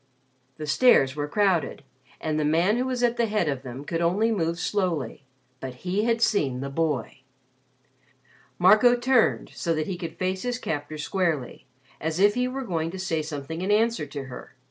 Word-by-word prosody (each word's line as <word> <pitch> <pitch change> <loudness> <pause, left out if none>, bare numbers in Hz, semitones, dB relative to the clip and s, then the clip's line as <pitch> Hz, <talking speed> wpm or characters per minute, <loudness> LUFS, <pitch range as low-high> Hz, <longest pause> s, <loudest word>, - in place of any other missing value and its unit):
The 155 - -5
stairs 145 - +4
were 145 -1 -2
crowded 185 -5 +1 0.4
and 155 -1 -1
the - - +1
man 170 +8 +2
who 250 - 0
was 250 -1 -2
at 240 0 +2
the 235 - +2
head 210 -5 0
of 140 -3 -1
them 130 +3 -8
could 165 +2 -2
only 200 +7 +2
move 170 -5 0
slowly. 170 - -2 0.3
But 130 +4 -8
he 195 +4 0
had 230 -1 +2
seen 140 - +1
the 140 +1 -4
boy. 150 -5 -2 1.4
Marco 215 +7 +6
turned 245 0 +2
so 165 -2 -1
that 155 0 -1
he 180 0 -4
could 165 -3 -6
face 185 0 -1
his 245 0 -2
captor 150 - -4
squarely 155 -4 -2 0.3
as 160 +2 -2
if 205 +1 +5
he 250 +2 0
were 265 +1 -4
going 165 -7 -2
to 190 - -7
say 170 -4 -1
something 155 +2 -5
in 190 - -2
answer 215 -6 +2
to 140 -2 -6
her. 130 -2 -10
170 Hz, 190 wpm, -25 LUFS, 150-210 Hz, 1.4 s, Marco